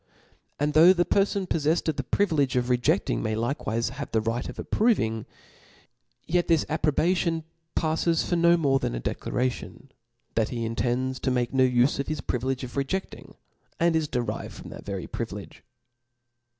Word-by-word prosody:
And 150 +1 +1
though 165 +5 +8
the 175 -1 +1
perfon 200 -1 +1
poffcfled 160 +1 +1
of 160 - +1
the 140 - -1
privilege 150 -6 +1
of 125 0 +1
rejcding, 120 - +1
may 110 - -1
like 120 +6 -2
wife 115 +2 0
have 140 +3 -6
the 110 - +2
right 115 +3 -2
of - - -8
approving; 115 - +1 1.0
yet 175 +1 +1
this 165 -3 +3
approbation 160 +2 +1 0.3
pafles 165 +1 +1
for 175 - +1
no 170 0 +5
more 140 -4 +2
than - - -2
a - - -3
declaration, 125 - -3 0.4
that 110 -1 +1
he 115 -2 -3
intends 125 +3 -1
to 130 - -1
make 125 -1 0
no 130 -1 +4
ufe 125 +2 +2
of 140 - -2
bis 155 - -2
privilege 130 +2 -2
of 120 - -6
reje&bg, 140 +8 -4 0.4
and 170 0 +3
is 160 -2 +1
derived 120 -6 -3
from - - -10
that - - -10
very - - -4
privilege. - - -6
140 Hz, 170 wpm, -26 LUFS, 120-165 Hz, 1.0 s, though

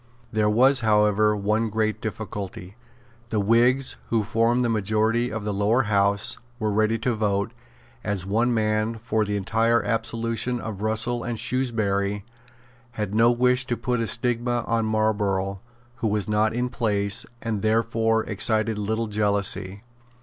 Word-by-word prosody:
There 105 -1 +1
was, 130 +5 +4
however, 105 -1 +3
one 110 +3 0
great 110 0 -1
difficulty. 100 -3 -6 0.5
The 110 - 0
Whigs, 120 +6 +3
who 115 -2 +1
formed 115 +3 +1
the - - +2
majority 110 +2 +1
of 110 -1 -4
the 105 0 -2
Lower 105 +6 +2
House, 100 -1 +1 0.2
were 110 -3 -1
ready 110 +2 +1
to 120 +2 -1
vote, 105 -1 -1 0.5
as 100 -3 -2
one 115 +5 +1
man, 110 0 0
for 110 -1 -1
the 105 0 -2
entire 115 +4 +1
absolution 115 +1 -1
of 110 -4 -6
Russell 110 +2 -1
and 120 -1 -3
Shrewsbury, 110 -6 0
and 105 -1 -7 0.7
had 105 -3 -4
no 115 +2 +5
wish 125 +1 +2
to 120 - -1
put 125 -2 -1
a 115 - -1
stigma 120 +1 +1
on 115 -1 0
Marlborough, 100 -3 0 0.4
who 115 - -1
was 105 -2 -1
not 105 +1 +2
in 125 +1 -1
place, 100 -5 -1
and 110 -3 -3
therefore 115 0 +1
excited 110 +1 0
little 110 +2 -1
jealousy. 100 -2 0
110 Hz, 150 wpm, -24 LUFS, 105-115 Hz, 0.7 s, no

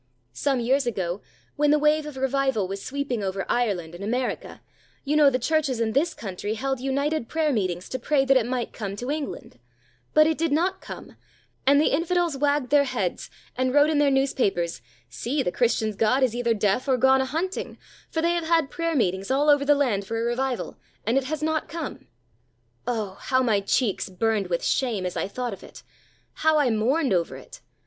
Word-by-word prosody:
Some 270 - 0
years 260 +2 +1
ago, 185 -4 -2 0.4
when 295 0 +3
the 300 - +5
wave 300 +1 +2
of 295 -3 -8
revival 265 -6 0
was 195 +1 -6
sweeping 270 -4 -3
over 195 0 -2
Ireland 195 -9 -1
and 175 +3 -8
America, 245 +5 -3 0.4
you 290 +2 0
know 300 -2 +7
the 255 - 0
Churches 275 -1 0
in 225 -1 0
this 300 +8 +1
country 205 +1 -4
held 270 +2 -2
united 275 +1 -1
prayer 315 -2 +1
meetings 185 -5 -2
to 255 - -3
pray 270 +2 +2
that 270 0 +4
it 240 -3 +3
might 250 -1 -3
come 200 -2 -5
to 245 +6 -4
England; 300 -1 -5 0.6
but 310 0 +7
it 315 0 0
did 330 -2 +1
not 360 +6 +1
come, - - -10 0.5
and 285 +1 +6
the 300 - +2
infidels 340 +1 +1
wagged 285 -2 0
their 290 -1 +5
heads, 235 -9 -3 0.3
and 255 +1 0
wrote 295 +2 +5
in 300 - +2
their 290 -1 +4
newspapers: 245 - 0 0.3
"See, 240 - -2
the 180 - -1
Christians' 220 -2 +1
God 225 +6 +2
is 250 -4 +2
either 235 -1 +1
deaf 205 +5 0
or 260 -2 +3
gone 265 +2 +4
a - - 0
hunting, 330 +8 -3 0.3
for 320 - -2
they 340 +1 +3
have 340 -2 -2
had 330 -5 +2
prayer 335 -1 -1
meetings 190 -6 0
all 285 +3 +4
over 290 -1 +4
the 290 +1 +4
land 220 -9 0
for 225 +2 -2
a - - -1
revival, 245 +1 -2 0.3
and 225 +4 +1
it 270 -1 +2
has 305 +2 -3
not 315 0 -1
come." 320 -1 -6 0.8
Oh! 215 -5 -2
how 260 0 +1
my 220 -5 +2
cheeks 200 0 0
burned 205 +1 0
with 170 -1 -2
shame 225 -8 0
as 180 - -3
I - - -1
thought 245 +2 -4
of 195 - -10
it; - - -13 0.6
how 315 0 +4
I 280 -5 +3
mourned 255 +5 +1
over 170 -7 0
it! 135 - -13
260 Hz, 205 wpm, -25 LUFS, 215-290 Hz, 0.8 s, know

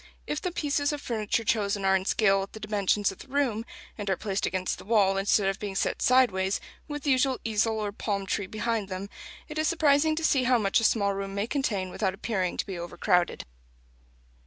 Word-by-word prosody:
If 300 0 -3
the 360 - -2
pieces 290 -3 0
of 295 - -3
furniture 230 -3 -1
chosen 205 -3 0
are 190 0 +4
in 190 0 0
scale 195 -2 +3
with 195 - -7
the 220 - -8
dimensions 205 -1 +1
of 195 - -13
the - - -11
room, 260 -5 0 0.4
and 205 -1 -3
are 190 - +1
placed 200 -2 -2
against 185 0 -2
the - - -10
wall, 200 -3 +3
instead 195 0 +2
of 195 +1 -1
being 200 -2 -5
set - - -1
sideways, 200 -7 +3 0.3
with 295 -1 -5
the 285 - +2
usual 260 0 +2
easel 220 0 +1
or 210 -1 -2
palm 200 -1 -3
tree 195 0 -2
behind 215 -1 -2
them, 190 +2 -5 0.4
it 305 0 -5
is 310 - +2
surprising 310 -2 +3
to 325 - -3
see 270 -5 +3
how 250 0 +4
much 200 -1 +2
a - - -2
small 200 -2 +2
room 195 0 -5
may 200 +1 0
contain 210 -8 -1
without 190 -1 -1
appearing 195 -4 -2
to - - -1
be 190 -3 -6
overcrowded. 175 +1 0
210 Hz, 215 wpm, -27 LUFS, 195-255 Hz, 0.4 s, are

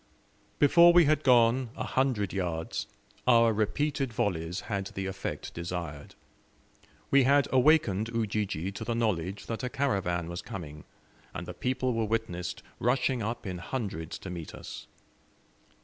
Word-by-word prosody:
Before 170 +4 +7
we 175 -1 +7
had 155 0 +3
gone 125 -1 +4
a - - -3
hundred 125 -8 0
yards 85 -4 -3 0.4
our 115 -2 +6
repeated 135 +5 0
volleys 90 -4 -1
had 100 -3 -3
the 95 0 -5
effect 95 +1 -5
desired. 85 -4 -5 1.0
We 140 - +6
had 140 +1 +4
awakened 125 -7 +3
Ujiji 105 -6 -2
to 100 - -6
the 115 +1 -2
knowledge 100 -4 -1
that 115 - -4
a 125 - -1
caravan 95 -12 -1
was 85 0 -5
coming, 75 -5 -8 0.5
and - - -4
the - - -7
people 130 0 -1
were 115 -1 0
witnessed 110 -5 -3 0.2
rushing 125 +1 +1
up 115 +3 -3
in 90 -2 -4
hundreds 90 -6 -4
to 95 - -8
meet 85 -3 -7
us. - - -9
110 Hz, 145 wpm, -29 LUFS, 90-125 Hz, 1.0 s, Before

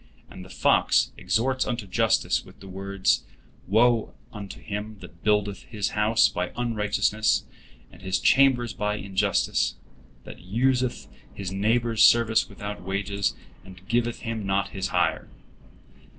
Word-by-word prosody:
And 90 - -10
the 95 - -13
fox - - +2
exhorts 130 +3 0
unto 120 -4 -3
justice 115 +4 +1
with - - -17
the 95 - -12
words: 95 0 0 0.5
"Woe 115 +3 +2 0.2
unto 100 -2 -8
him 105 +1 -6
that 85 -2 -13
buildeth 105 -2 +1
his 105 -3 -3
house 110 +2 +3
by 90 0 -3
unrighteousness, 110 -2 +1 0.5
and - - -16
his 95 0 -1
chambers 125 -5 +3
by 105 0 -1
injustice; 95 -10 0 0.5
that - - -11
useth 125 +7 0 0.3
his 95 -2 -5
neighbor's 115 +3 +1
service 115 -1 +5
without 100 +1 -7
wages, 100 +2 -2 0.3
and 95 0 -15
giveth 120 0 -1
him 115 -2 -4
not 100 0 0
his 95 -1 -3
hire." - - 0
105 Hz, 135 wpm, -25 LUFS, 95-115 Hz, 0.5 s, service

